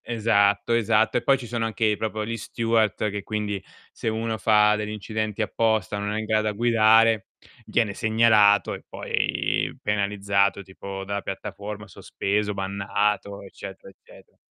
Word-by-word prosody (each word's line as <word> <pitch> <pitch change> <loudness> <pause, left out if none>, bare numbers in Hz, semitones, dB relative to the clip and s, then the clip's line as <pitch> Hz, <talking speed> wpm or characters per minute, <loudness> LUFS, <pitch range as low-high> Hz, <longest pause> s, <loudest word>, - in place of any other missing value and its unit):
esatto, 105 -2 +1
esatto, 115 0 +2
e - - -5
poi 135 - +4
ci 125 - -8
sono 115 -1 -2
anche 110 -1 +1
proprio 110 -1 -3
gli 115 +1 -3
steward, 110 -2 0
che 100 0 -5
quindi 105 -1 -3 0.3
se - - -4
uno 110 0 -2
fa 105 0 +4
degli 105 0 -4
incidenti 110 +1 -3
apposta, 110 -2 0
o - - -3
non 105 +1 -2
è 110 - -2
in - - -4
grado 110 0 +1
a - - -1
guidare, 115 -1 +4 0.4
viene 110 -4 +1
segnalato 110 -2 +4
e - - -9
poi - - -1
penalizzato, 100 -1 0
tipo 95 +1 -8
dalla 100 +1 -3
piattaforma, 105 +1 -6
sospeso, 105 +2 -2
bannato, 100 +1 -2
eccetera, 95 0 -10
eccete - - -20
105 Hz, 155 wpm, -24 LUFS, 100-110 Hz, 0.4 s, poi